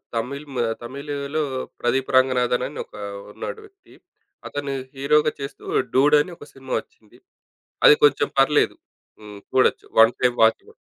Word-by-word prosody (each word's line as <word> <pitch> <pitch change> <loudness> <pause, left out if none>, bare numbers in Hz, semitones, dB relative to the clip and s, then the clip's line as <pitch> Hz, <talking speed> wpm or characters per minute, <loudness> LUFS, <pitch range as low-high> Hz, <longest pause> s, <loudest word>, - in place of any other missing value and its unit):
తమిళ్ 140 +6 -4
మ - - -4 0.3
తమిళలో 140 +3 -4 0.4
ప్రదీప్ 130 +2 0
రంగనాధనని 130 +1 +1
ఒకా 105 - -12 0.3
ఉన్నాడు 440 - -6
వ్యక్తి, 390 -2 -22 0.6
అతను 145 -1 -4 0.2
హీరోగా 150 +2 +2
చేస్తూ 140 0 -8 0.3
'డూడ్' 145 +3 +5
అని 175 +3 -6
ఒక 145 - -13
సినిమా 135 -1 -8
వచ్చింది. 105 -2 -19 0.7
అది 150 - +9
కొంచెం 145 -1 +3
పర్లేదు. 145 +2 +3 0.4
హ్మ్. 105 -1 -11
చూడొచ్చు. 130 - +2
1 115 +2 +7
టైమ్ 125 -1 +2
వాచబుల్. 110 0 +1
135 Hz, 130 wpm, -22 LUFS, 125-145 Hz, 0.7 s, అది